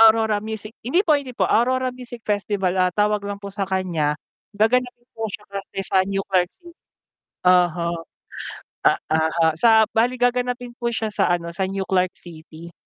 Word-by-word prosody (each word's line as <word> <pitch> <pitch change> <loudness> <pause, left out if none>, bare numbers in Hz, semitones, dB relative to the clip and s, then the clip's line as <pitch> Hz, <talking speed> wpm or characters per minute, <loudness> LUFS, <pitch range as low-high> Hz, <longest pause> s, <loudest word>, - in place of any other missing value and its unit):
Aurora 220 -1 +5
Music 220 0 -6
hindi 300 - +2
po, 305 - +5
hindi 280 -3 -2
po. - - +1
Aurora 255 +2 +2
Music 245 -2 -9
Festival, 205 -3 0
ah, 185 0 +3
tawag 210 +2 +1
lang 200 0 -5
po 200 0 -8
sa 200 - -2
kaniya, 170 -6 -1 0.4
gaganapin 240 +3 +1
po 225 0 -3
siya 210 - -8
kasi 195 0 -7
sa 190 -1 +3
New 195 +1 -2
Clark 180 -2 +2
Ci 345 - -14 0.8
oho. 175 -2 +4 0.9
Ah, - - +4 0.2
oho, 160 +1 +2
sa 220 -2 +6
bale 240 +3 +2
gaganapin 245 0 0
po 235 - 0
siya 220 -2 -2
sa, - - +2
ano, 170 -1 0
sa 190 +2 -1
New 195 0 -2
Clark 185 -2 +1
City. 165 0 -12
205 Hz, 175 wpm, -22 LUFS, 185-235 Hz, 0.9 s, sa